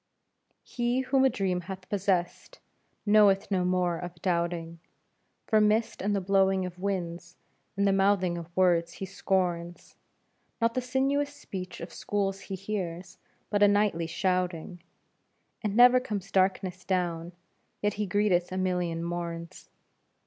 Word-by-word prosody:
He 240 +1 -1
whom 265 +1 +2
a 265 - +6
dream 190 -7 -1
hath 185 +1 -8
possessed 190 -3 -1 0.5
knoweth 205 -1 +4
no 185 -2 +2
more 180 -2 +1
of 175 -1 -8
doubting, 170 -2 -1 0.7
For 215 -2 +3
mist 215 +2 +1
and 205 +1 0
the - - +1
blowing 190 0 +2
of 180 0 -8
winds 175 -3 -3 0.4
and 200 0 +2
the 195 - +3
mouthing 195 -2 +2
of 170 -1 -7
words 170 -2 +3
he 195 - -6
scorns; 180 -2 -2 0.6
Not 230 0 +2
the 255 - 0
sinuous 275 +3 0
speech 185 -8 -7
of 170 0 -8
schools 195 -1 -2
he 195 0 -6
hears, 185 -2 -5 0.3
but 205 -1 +1
a 205 - +8
knightly 205 -5 +2
shouting, 180 0 -2 0.8
And 210 -2 -2
never 245 +2 +7
comes 200 -6 -5
darkness 185 -1 +1
down, 175 -2 -2 0.5
yet 205 0 +2
he 210 0 -2
greeteth 185 -2 +1
a 185 - -3
million 180 -3 -1
morns. 170 0 -5
190 Hz, 140 wpm, -28 LUFS, 175-205 Hz, 0.8 s, a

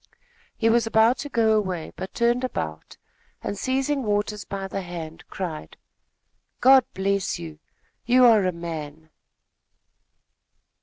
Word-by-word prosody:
He 225 - +1
was 230 0 +3
about 225 +3 +4
to 290 - -5
go 225 -4 +3
away, 185 -6 -2
but 190 - -7
turned 240 +2 +2
about 80 - -5 0.5
and, - - -3
seizing 270 +5 -1
Waters 210 -2 -1
by 195 -1 -5
the 195 - -4
hand, 175 -2 -8
cried: 170 -5 -6 0.8
"God 265 -1 +6
bless 195 0 0
you! 160 -3 -9 0.5
You 250 +1 +6
are 220 -5 +6
a - - +1
man!" 160 -2 -7
200 Hz, 130 wpm, -24 LUFS, 170-235 Hz, 0.8 s, God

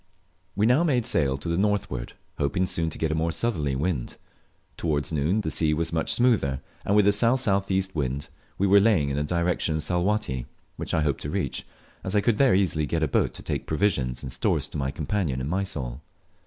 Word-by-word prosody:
We 100 - +2
now 125 +8 +4
made 130 -8 +1
sail 70 - +2
to 70 - -8
the 85 +1 0
northward, 100 -12 -1 0.3
hoping 75 +6 +1
soon 85 -2 -1
to - - -6
get 80 -1 -1
a - - +1
more 80 +1 0
southerly 80 - -1
wind. 70 -3 -2 0.6
Towards 75 -3 -1
noon 80 +8 +1
the 80 - -2
sea 75 -1 +1
was 85 +1 -2
much 80 - 0
smoother, 110 - +2 0.2
and 100 - +1
with 105 -1 +5
a - - +6
S.S.E. 100 -4 +2
wind 70 -1 -2 0.3
we 100 - +1
were 100 +1 +6
laying 100 -9 +3
in 70 - -2
the 75 - 0
direction 85 0 0
of 80 - -1
Salwatty, 90 - -1 0.3
which - - -3
I 80 - +2
hoped 70 -3 -1
to - - -4
reach, - - -3 0.4
as 95 +2 -3
I 105 - +4
could 115 0 +1
there 135 -8 +5
easily 85 -6 +1
get 80 +1 0
a - - +2
boat - - +1
to - - -9
take - - -3
provisions 75 -8 0
and 65 - -5
stores - - 0
to - - -6
my 65 -1 -1
companion 75 -1 -2
in 65 - -3
Mysol. 75 -8 -3
85 Hz, 210 wpm, -26 LUFS, 70-100 Hz, 0.6 s, a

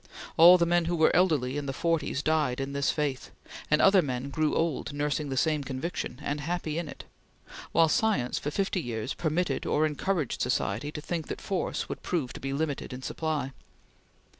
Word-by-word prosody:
All 175 +3 +9
the 170 - +2
men 175 0 +2
who 175 +1 0
were 160 -1 +4
elderly 145 -7 +2
in 140 - -6
the 135 - -2
forties 165 -2 -1
died 150 -5 +1
in 135 +1 -3
this 140 0 +1
faith, 145 -4 -1 0.4
and 150 - +4
other 195 -1 +6
men 135 -2 -3
grew 155 +1 +1
old 165 -3 -1
nursing 145 0 -1
the 135 - -3
same 155 0 +1
conviction, 135 0 -4
and 145 +1 -2
happy 165 0 -2
in 170 - -4
it; - - -9 0.7
while 165 -1 +5
science, 155 - +1
for 150 - -3
fifty 190 +3 -1
years, 120 -1 -3
permitted, 175 +2 -1
or 155 - +2
encouraged, 155 -1 -1
society 125 +2 -1
to 150 - -6
think 165 0 -4
that - - -5
force 190 -3 -2
would - - -6
prove 155 -9 -2
to - - -8
be 135 - -4
limited 140 -2 -2
in 130 +1 -8
supply. 155 -3 -2
150 Hz, 190 wpm, -28 LUFS, 135-165 Hz, 0.7 s, All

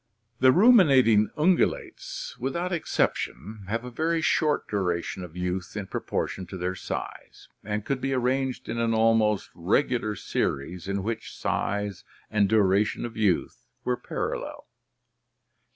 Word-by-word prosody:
"The 130 0 +7
Ruminating 135 - +6
Ungulates 175 +4 0
without 170 +9 -2
exception 105 - -2
have 115 +4 -2
a 125 - -7
very 165 +6 0
short 155 -1 +1
duration 90 -2 -2
of 90 0 -10
youth 90 +1 -3
in 100 - -3
proportion 95 -1 -3
to 95 - -7
their 90 +1 -2
size, 95 - -7
and 105 0 -3
could 135 0 -1
be 135 - -1
arranged 130 +1 0
in 115 - -3
an 115 -1 +1
almost 110 -2 +2
regular 105 +4 0
series 90 0 -2
in 100 -1 -2
which 110 +1 -4
size 100 -2 -2 0.3
and 105 -2 +3
duration 105 0 +2
of 115 -1 -7
youth 105 -6 0 0.2
were 125 - +1
parallel. - - -4
110 Hz, 135 wpm, -26 LUFS, 95-130 Hz, 0.3 s, The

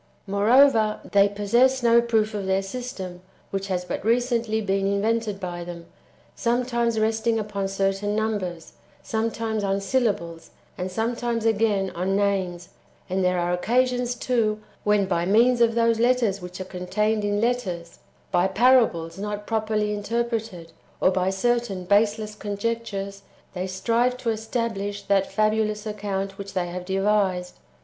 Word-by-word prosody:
8. - - -8
Moreover, 220 +1 +4
they 200 0 +5
possess 240 +6 +2
no 235 0 +6
proof 220 -2 +1
of 200 -2 -3
their 190 0 +1
system, 195 -5 -6 0.3
which 195 0 -3
has 180 -2 -2
but - - -4
recently 230 -1 +1
been 195 -2 0
invented 210 +1 0
by 175 -2 -5
them, 170 -1 -8 0.5
sometimes 235 -2 0
resting 220 +1 +1
upon 205 -2 -2
certain 195 +1 -1
numbers, 205 -6 -3 0.3
sometimes 220 -1 -2
on 195 0 0
syllables, 195 -8 -1 0.3
and 185 0 -4
sometimes, 230 +2 -1
again, 210 -3 +2
on 185 +3 -1
names; 190 -3 -1 0.4
and 190 0 +1
there 180 0 +2
are 175 0 0
occasions, 245 +5 +1
too, 230 -4 0 0.2
when, 210 -1 +3
by 175 -3 0
means 235 +6 +4
of 230 -1 +4
those 230 -1 +2
letters 235 -5 +2
which 180 +1 -8
are 185 - -4
contained 210 +4 -1
in 205 0 0
letters, 195 -8 -2 0.3
by 175 +1 +3
parables 195 -6 +3
not 210 0 -4
properly 215 -1 0
interpreted, 220 -5 -3 0.3
or 185 - +4
by 185 0 +1
certain 200 -2 0
[baseless] 210 +2 +2
conjectures, 200 -1 -4 0.3
they 185 0 -3
strive 230 +6 +1
to 240 -2 -1
establish 220 -3 -3
that 195 -1 +1
fabulous 215 0 +1
account 195 -2 -3
wdiich 195 0 -7
they 185 -2 0
have 180 +1 -6
devised. 190 -2 0
210 Hz, 145 wpm, -24 LUFS, 190-230 Hz, 0.5 s, no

